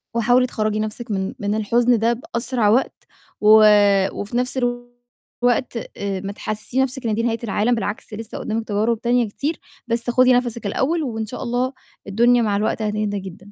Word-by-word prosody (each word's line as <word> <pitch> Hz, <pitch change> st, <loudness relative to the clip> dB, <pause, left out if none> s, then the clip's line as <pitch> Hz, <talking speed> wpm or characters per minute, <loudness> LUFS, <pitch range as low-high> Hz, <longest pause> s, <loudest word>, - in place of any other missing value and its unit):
وحاولي 245 Hz, +2 st, +3 dB
تخرّجي 215 Hz, -2 st, -1 dB
نَفْسِك 215 Hz, +2 st, -4 dB
من 190 Hz, -1 st, -2 dB
من 205 Hz, +1 st, -1 dB
الحُزن 235 Hz, +2 st, +2 dB
ده 230 Hz, +1 st, +2 dB
بأسرع 235 Hz, -2 st, -1 dB
وقت، 245 Hz, +5 st, +1 dB, 0.4 s
و 215 Hz, +1 st, +7 dB, 0.5 s
وفي 210 Hz, +4 st, -4 dB
نَفْس 250 Hz, +2 st, -1 dB, 0.9 s
الوقت 245 Hz, 0 st, +1 dB, 0.2 s
آآ، 195 Hz, -2 st, -3 dB
ما 200 Hz, 0 st, -5 dB
تحسسيش 215 Hz, +5 st, -4 dB
نَفْسِك 265 Hz, -2 st, -2 dB
إن 215 Hz, -, 0 dB
دي 230 Hz, -, -1 dB
نهاية 230 Hz, -1 st, 0 dB
العالم، 225 Hz, +3 st, +1 dB
بالعكس 215 Hz, 0 st, -5 dB
لسّة 225 Hz, +1 st, -6 dB
قُدّامك 225 Hz, +1 st, -3 dB
تجارب 220 Hz, +2 st, 0 dB
تانية 240 Hz, -1 st, +2 dB
كتير، 295 Hz, +9 st, -3 dB, 0.3 s
بس 235 Hz, +1 st, -1 dB
خُدي 255 Hz, +1 st, +5 dB
نَفَسِك 240 Hz, -3 st, -1 dB
الأوّل، 310 Hz, +10 st, 0 dB
وإن 225 Hz, -4 st, -3 dB
شاء 250 Hz, +5 st, -7 dB
الله 250 Hz, +2 st, -1 dB, 0.3 s
الدنيا 235 Hz, +4 st, +3 dB
مع 210 Hz, -3 st, +1 dB
الوقت 220 Hz, +1 st, -1 dB
هتهدى 210 Hz, -1 st, -1 dB
جدًا. 190 Hz, +1 st, -11 dB
230 Hz, 175 wpm, -21 LUFS, 210-245 Hz, 0.9 s, و